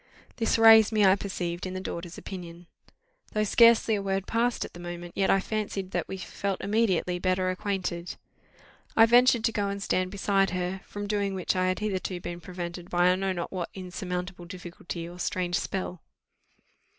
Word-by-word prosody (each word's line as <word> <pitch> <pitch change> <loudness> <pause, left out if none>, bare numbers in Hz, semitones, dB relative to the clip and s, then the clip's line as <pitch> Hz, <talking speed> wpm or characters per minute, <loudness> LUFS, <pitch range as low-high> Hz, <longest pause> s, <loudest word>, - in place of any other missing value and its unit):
This 225 -1 +1
raised 225 -1 +8
me, 215 -2 +4
I 190 0 +6
perceived, 180 -3 -4
in 185 - -6
the - - -2
daughter's 175 -2 -6
opinion. 175 -2 -8 0.7
Though 215 - +1
scarcely 230 +1 +5
a 205 - 0
word 195 -1 -1
passed 235 +1 0
at - - -11
the 175 - -10
moment, 175 0 -7
yet 195 - +1
I 195 - +5
fancied 200 -2 -3
that - - -2
we 190 - -5
felt 195 0 -3
immediately 200 -4 +1
better 185 0 +1
acquainted. 185 -2 -3 0.8
I 225 - +9
ventured 240 0 +5
to 225 - +2
go 205 -2 -1
and 200 0 -3
stand 185 -2 0
beside 195 0 +1
her, 185 +1 -3
from 205 0 -6
doing 200 -1 -1
which 185 0 -1
I 185 0 +1
had 185 - 0
hitherto 190 -3 -2
been 175 0 -6
prevented 175 0 -7
by 175 +1 +4
I - - +3
know 190 +1 -1
not 175 -2 -4
what 180 -3 -3
insurmountable 180 -1 -5
difficulty 175 -1 -7
or 175 +1 -11
strange 175 0 -1
spell. 185 -3 -4
185 Hz, 185 wpm, -27 LUFS, 180-200 Hz, 0.8 s, I